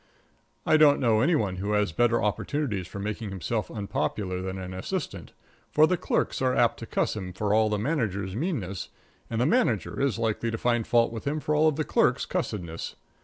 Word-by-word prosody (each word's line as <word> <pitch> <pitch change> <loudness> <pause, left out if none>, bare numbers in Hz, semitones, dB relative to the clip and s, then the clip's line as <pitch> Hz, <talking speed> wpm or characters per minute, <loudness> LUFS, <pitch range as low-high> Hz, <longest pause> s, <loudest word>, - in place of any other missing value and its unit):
I 155 - +5
don't 150 -2 +6
know 110 -3 +3
any 165 +6 +3
one 100 -9 0
who 100 +3 -2
has 105 -4 +2
better 120 +5 +2
opportunities 105 - -1
for - - -9
making 105 +2 -4
himself 95 +4 -3
unpopular 95 -2 -2
than 95 0 -4
an 95 -1 -6
assistant, 95 - -4 0.4
for 155 - +5
the 180 - +2
clerks 170 - -1
are 130 -1 +2
apt 120 - +3
to 115 - -7
cuss - - 0
him 95 -4 -5
for 105 +2 0
all 110 0 +4
the 105 - 0
manager's 100 - -1
meanness, 115 - -3 0.4
and 115 - -2
the 125 - +3
manager 135 - +1
is 140 -4 +1
likely 115 0 -1
to 115 - -2
find 120 -1 0
fault 115 -1 +3
with 115 - -6
him 150 +2 0
for 150 - -1
all 155 +1 +4
the 155 +1 -2
clerks' - - +2
cussedness. 85 -5 -4
110 Hz, 200 wpm, -27 LUFS, 100-130 Hz, 0.4 s, don't